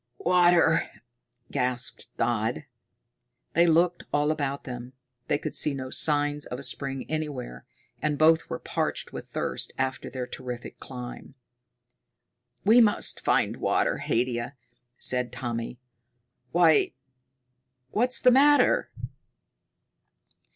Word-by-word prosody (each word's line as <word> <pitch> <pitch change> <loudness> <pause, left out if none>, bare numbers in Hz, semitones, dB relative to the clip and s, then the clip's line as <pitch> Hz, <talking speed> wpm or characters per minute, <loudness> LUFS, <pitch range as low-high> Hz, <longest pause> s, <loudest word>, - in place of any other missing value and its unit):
"Water!" 175 -2 +3 0.6
gasped 125 -2 -2
Dodd. 115 +3 -1 0.9
They 170 +2 +4
looked 170 +2 +2
all 145 +1 +1
about 140 -3 -3
them. 125 0 -8 0.3
They - - +1
could - - -6
see 150 - +5
no 130 -1 -6
signs 145 -1 +2
of 125 - -6
a 140 - -9
spring 135 +1 -3
anywhere, 145 - -5 0.4
and 150 0 -1
both 160 +2 +3
were - - -3
parched - - -3
with - - -7
thirst - - -3
after 130 -1 -3
their 130 -2 -5
terrific 125 -1 -8
climb. 125 +1 -9 1.3
"We 225 +4 +6
must 210 -3 +3
find - - +1
water, - - 0
Haidia," 120 +2 -2 0.4
said 125 -2 +2
Tommy. 120 -1 -5 0.7
"Why, 165 -3 +4 1.0
what's 245 +4 +3
the 250 - +6
matter?" 290 +3 +4
140 Hz, 110 wpm, -26 LUFS, 125-165 Hz, 1.3 s, We